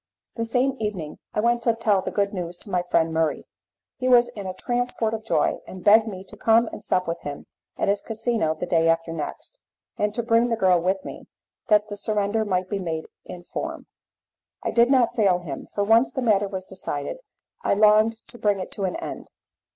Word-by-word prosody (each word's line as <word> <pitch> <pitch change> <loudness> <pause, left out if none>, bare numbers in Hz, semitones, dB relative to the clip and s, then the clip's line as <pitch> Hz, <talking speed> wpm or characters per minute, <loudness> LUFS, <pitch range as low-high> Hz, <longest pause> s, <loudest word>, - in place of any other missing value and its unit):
The 230 - -2
same 255 +4 +1
evening 195 -8 -4 0.2
I 210 - +2
went 235 +1 +2
to 230 -1 +2
tell 215 -4 +2
the - - -3
good 200 0 0
news 175 -2 -4
to 205 - -11
my 180 - +2
friend 165 -2 +1
Murray. 160 -1 0 0.5
He 255 -1 0
was 240 -1 +6
in 205 -5 -7
a 185 - -3
transport 240 -1 -1
of 220 -1 -4
joy, 220 - +1
and 185 -1 -9
begged 215 +2 +6
me 190 -3 -6
to 195 - -13
come 225 +1 +3
and - - -9
sup 185 -1 +1
with 165 - -2
him 145 -1 -7 0.3
at - - 0
his 200 0 +1
casino 225 -7 -1
the 170 - -4
day 165 -2 +2
after 165 0 +1
next, 165 - -6 0.4
and 210 0 +1
to 235 - -1
bring 230 +1 +3
the 230 - +1
girl 185 -4 +3
with 190 +2 -1
me, - - -9 0.4
that 210 0 +4
the 205 - -5
surrender 210 +1 0
might 185 -3 -1
be 200 0 -2
made 165 -3 -3 0.2
in 175 -1 -9
form. - - -5 0.8
I - - -1
did 235 +1 +4
not 255 -4 +3
fail 195 -5 +3
him, 165 -6 -7
for 205 - -2
once 230 +4 +4
the 260 - -3
matter 205 -3 +3
was 190 -1 -5
decided, 150 - -5 0.4
I - - +1
longed 215 +2 +4
to 240 - -13
bring 205 -2 +1
it 185 - -6
to 195 - -3
an 185 - -2
end. - - -6
205 Hz, 215 wpm, -24 LUFS, 180-230 Hz, 0.8 s, was